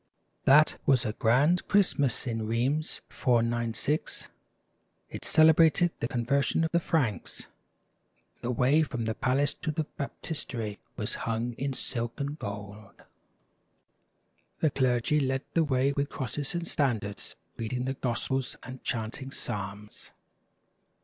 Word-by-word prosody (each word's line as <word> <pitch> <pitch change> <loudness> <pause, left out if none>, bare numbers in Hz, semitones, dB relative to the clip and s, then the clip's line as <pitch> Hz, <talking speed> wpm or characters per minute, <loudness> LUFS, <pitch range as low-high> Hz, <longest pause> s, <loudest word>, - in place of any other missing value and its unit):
That 150 +3 +6
was 130 -3 +4
a 110 - -1
grand 140 +11 +3
Christmas 145 -10 +2
in 115 -3 -2
Rheims, 130 +7 0
496. 120 +4 0 0.8
It - - -7
cele 160 0 +6
brated 165 +2 +4
the 115 - -1
conversion 140 +6 +1
of 160 - 0
the 170 - +3
Franks. 145 -11 -1 1.0
The 120 - -3
way 125 +5 +3
from 120 -7 -2
the 110 - 0
palace 135 +5 +1
to - - -2
the 155 +1 0
baptistery 135 - -5 0.2
was - - -2 0.2
hung 115 +2 -1
in 135 +3 -3
silk 120 0 -2
and 145 +2 -3
gold. 100 -1 -8 1.6
The 155 - +3
clergy 130 +2 +2
led 135 -1 0
the 165 - +4
way 135 -2 +2
with 140 +1 -1
crosses 140 +4 -3
and 170 -1 -2
standards, 110 -8 -1 0.2
reading 125 +3 -2
the 135 - -1
gospels 130 +1 -1
and 130 0 -8
chanting 120 +3 -3
psalms. 105 -4 -5
130 Hz, 130 wpm, -29 LUFS, 115-145 Hz, 1.6 s, That